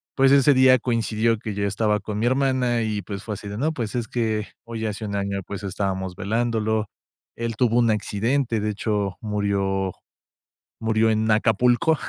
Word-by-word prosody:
pues, 135 0 +4
ese 140 +1 +6
día 130 -1 +6
coincidió 115 -1 0
que 110 -1 -5
yo 100 0 -1
estaba 105 +1 +1
con 105 +1 -5
mi 115 - 0
hermana 130 -2 +1
y, 105 -2 -1
pues, 100 +2 -6
fue 110 -2 -4
así 100 - -9
de: 100 +1 -5
"No, 150 +7 +1
pues 115 -9 -4
es 120 -2 -2
que 110 -3 -1 0.2
hoy 115 -1 -5
hace 105 +1 -4
un 100 -1 -3
año, 100 0 -2
pues, 100 - -6
estábamos 95 -1 -3
velándolo". 110 +1 0 0.5
Él 115 -1 -3
tuvo 120 0 +2
un 120 -2 +4
accidente, 115 +4 0
de 105 +1 -1
hecho, 105 -2 -2
murió 100 -2 -1 0.9
murió 110 0 +2
en 110 0 +1
Acapulco, 120 +8 +3
110 Hz, 180 wpm, -23 LUFS, 100-120 Hz, 0.9 s, ese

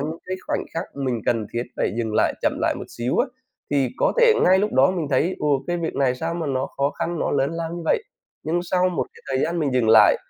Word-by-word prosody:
những 155 +3 -4
cái 185 0 -3
khoảnh - - -1
khắc 165 - -2
mình 130 -4 -1
cần 115 -3 +1
thiết 120 0 -1
phải - - 0
dừng 110 -2 -2
lại, - - +2
chậm - - +2
lại - - +1
một - - -6
xíu 120 +2 -2
á. - - +3 0.4
Thì 140 -3 +2
có - - +2
thể 475 -1 +7
ngay 185 +1 +5
lúc 210 +2 0
đó 130 +4 +5
mình 175 -4 -2
thấy, 160 +8 +1
ồ, 145 -3 +1
cái 175 - -1
việc 170 -1 -3
này 135 -2 +2
sao 165 +6 -3
mà 170 -2 -3
nó 135 -1 -1
khó 140 +1 +1
khăn, 170 +2 -3
nó - - 0
lớn 140 0 +1
lao 165 -1 -3
như 175 - -6
vậy, 285 - +2 0.4
nhưng 165 +3 0
sau 180 +1 +1
một 180 - -2
cái - - -17
thời 130 0 +1
gian 170 +2 -2
mình 145 -5 0
dừng 120 -3 +2
lại 110 - +7
150 Hz, 270 wpm, -23 LUFS, 130-175 Hz, 0.4 s, thể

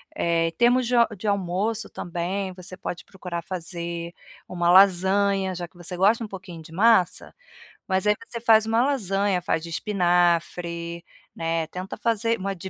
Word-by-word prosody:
Eh, 165 -1 +1
temos 245 +1 +3
de 250 - +1
a 235 -1 +5
de 205 +3 -6
almoço 200 +3 -1
também, 180 +3 -4
você 185 0 -9
pode 175 -2 -6
procurar 180 -3 -6
fazer 170 -1 -5 0.4
uma 175 -1 +1
lasanha, 195 +1 +4
já 175 0 -5
que 175 - -24
você 175 +1 -5
gosta 210 +6 +3
um - - -5
pouquinho 185 -4 -9
de 160 - -14
massa. 200 -1 +3 0.5
Mas 190 +1 0
aí 210 - +4
você 235 - -5
faz 220 -2 +5
uma 225 +2 +3
lasanha, 200 -8 0
faz 165 -2 -1
de 170 - -7
espinafre, 170 -2 0 0.3
né. 165 0 -1
Tenta 185 +3 -7
fazer 230 0 0
uma 195 +1 -3
de 190 +2 -8
185 Hz, 165 wpm, -24 LUFS, 170-205 Hz, 0.5 s, a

